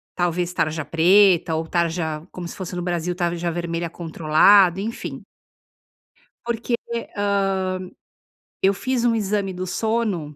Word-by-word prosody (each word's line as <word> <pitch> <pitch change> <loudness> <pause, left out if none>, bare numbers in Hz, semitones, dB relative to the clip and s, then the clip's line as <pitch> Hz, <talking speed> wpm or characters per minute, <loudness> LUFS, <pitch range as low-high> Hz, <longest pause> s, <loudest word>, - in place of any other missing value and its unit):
talvez 175 0 0
tarja 155 -2 -1
preta 175 +1 +4
ou 160 +1 -2
tarja 165 -2 -1
como 180 -1 -8
se - - -7
fosse 185 -1 -6
no 175 - -3
Brasil, 175 0 -2
tarja 175 -1 -1
vermelha 170 0 -3
controlado, 170 +4 +4
enfim. 225 +2 -5 1.2
Porque, 235 0 -2 0.4
hã, 205 0 +1 1.3
eu 195 +1 +4
fiz 250 +3 -1
um 230 -1 +3
exame 200 -2 -1
do 185 +1 -5
sono, 205 -8 -1
180 Hz, 130 wpm, -22 LUFS, 170-200 Hz, 1.3 s, preta